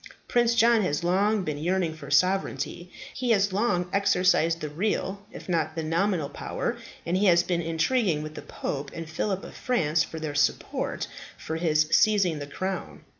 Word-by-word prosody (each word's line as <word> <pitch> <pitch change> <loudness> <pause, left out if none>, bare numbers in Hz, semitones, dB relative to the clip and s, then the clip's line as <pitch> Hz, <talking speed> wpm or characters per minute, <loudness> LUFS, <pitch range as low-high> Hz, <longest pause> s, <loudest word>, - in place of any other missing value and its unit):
Prince 240 -1 +2
John 230 0 +5
has 150 -5 -1
long 200 +4 +2
been 150 -3 -3
yearning 175 0 0
for 155 -3 -10
sovereignty. 180 +2 0 0.2
He 255 -1 -3
has 205 -3 +3
long 190 -4 +1
exercised 180 -4 +3
the 155 - -4
real, 190 +4 -2
if - - -10
not 160 -3 0
the 165 - -2
nominal, 165 0 0
power, - - -4 0.3
and 170 - 0
he 200 +2 +3
has 175 -1 +5
been 175 -1 -1
intriguing 165 +1 +1
with 155 0 -7
the - - -7
Pope 140 0 -5
and 165 -1 -6
Phillip 185 +4 -2
of - - -9
France 160 -11 +1
for 160 - -7
their 155 -2 -4
support 145 - -1 0.3
for 160 - -4
his 155 -2 +2
seizing 200 -8 +3
the 145 - -6
crown. 190 +4 -4
175 Hz, 175 wpm, -26 LUFS, 155-200 Hz, 0.3 s, John